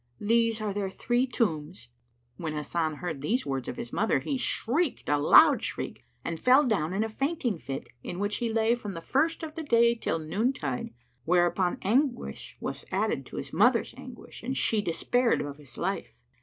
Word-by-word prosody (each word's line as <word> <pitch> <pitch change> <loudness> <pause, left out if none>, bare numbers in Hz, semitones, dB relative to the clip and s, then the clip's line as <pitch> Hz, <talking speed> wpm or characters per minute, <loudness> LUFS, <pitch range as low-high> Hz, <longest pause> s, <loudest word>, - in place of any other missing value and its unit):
These 230 +1 +2
are 210 -2 -2
their 200 -1 -2
three 240 +6 0
tombs."[FN#99] 165 - -2 0.6
When 155 -2 -2
Hasan 155 +1 -1
heard 160 -3 -5
these 230 - 0
words 135 -2 -3
of - - -5
his 120 - -6
mother, 220 - +2
he 280 - -2
shrieked 265 +4 0
a 145 0 +2
loud 145 - +7
shriek - - -4 0.2
and 165 -1 -3
fell 260 +4 +5
down 185 -8 +1
in 205 +3 +1
a - - -1
fainting 245 - -1
fit 135 -1 -6
in 175 - -6
which 205 +2 -1
he 235 -2 -1
lay 225 +1 +3
from 210 -6 -5
the - - -4
first 320 - 0
of 310 -1 -5
the 325 - -5
day 235 -5 +4
till 225 -7 -2
noon 195 - 0
tide; 135 - -4 0.3
whereupon 175 +3 +2
anguish 245 +5 0
was - - -5
added - - -1
to - - -9
his - - -6
mother's - - +3
anguish - - -11
and 260 +3 -3
she 220 -2 +2
despared 235 +7 +1
of 145 -1 -5
his 145 -4 -15
life. 190 +3 -3
210 Hz, 190 wpm, -28 LUFS, 160-240 Hz, 0.6 s, loud